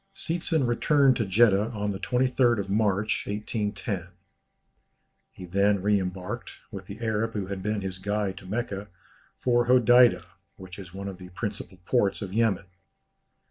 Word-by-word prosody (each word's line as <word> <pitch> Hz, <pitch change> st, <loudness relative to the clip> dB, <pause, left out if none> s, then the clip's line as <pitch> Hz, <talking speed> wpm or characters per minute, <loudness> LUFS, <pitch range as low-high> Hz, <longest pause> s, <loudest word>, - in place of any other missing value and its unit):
Seetzen 165 Hz, -3 st, -1 dB
returned 135 Hz, +3 st, +3 dB
to 110 Hz, -, -1 dB
Jeddah 105 Hz, +1 st, +4 dB
on 105 Hz, -1 st, -2 dB
the 95 Hz, -, -5 dB
23rd 125 Hz, -2 st, +1 dB
March, 105 Hz, 0 st, 0 dB
1810. 105 Hz, -3 st, -3 dB, 1.2 s
He 90 Hz, -, -11 dB
then 100 Hz, +3 st, +2 dB
re 100 Hz, +1 st, +2 dB
embarked, 95 Hz, +5 st, -5 dB, 0.2 s
with 95 Hz, -3 st, -8 dB
the 100 Hz, +2 st, -8 dB
Arab 115 Hz, 0 st, -1 dB
who 100 Hz, -3 st, -2 dB
had 95 Hz, 0 st, -5 dB
been 105 Hz, +1 st, -2 dB
his 95 Hz, -1 st, -5 dB
guide 100 Hz, 0 st, -1 dB
to 95 Hz, -, -13 dB
Mecca, 105 Hz, -1 st, -3 dB, 0.5 s
for 120 Hz, -1 st, +1 dB
Hodeidah, 120 Hz, -7 st, +5 dB, 0.3 s
which 95 Hz, 0 st, -11 dB
is 95 Hz, -3 st, -10 dB
one 100 Hz, +2 st, -6 dB
of 95 Hz, -2 st, -7 dB
the 90 Hz, -1 st, -10 dB
principal 100 Hz, 0 st, -6 dB
ports 105 Hz, -4 st, +1 dB
of 95 Hz, -1 st, -7 dB
Yemen. 110 Hz, -3 st, +1 dB
105 Hz, 150 wpm, -26 LUFS, 95-115 Hz, 1.2 s, Hodeidah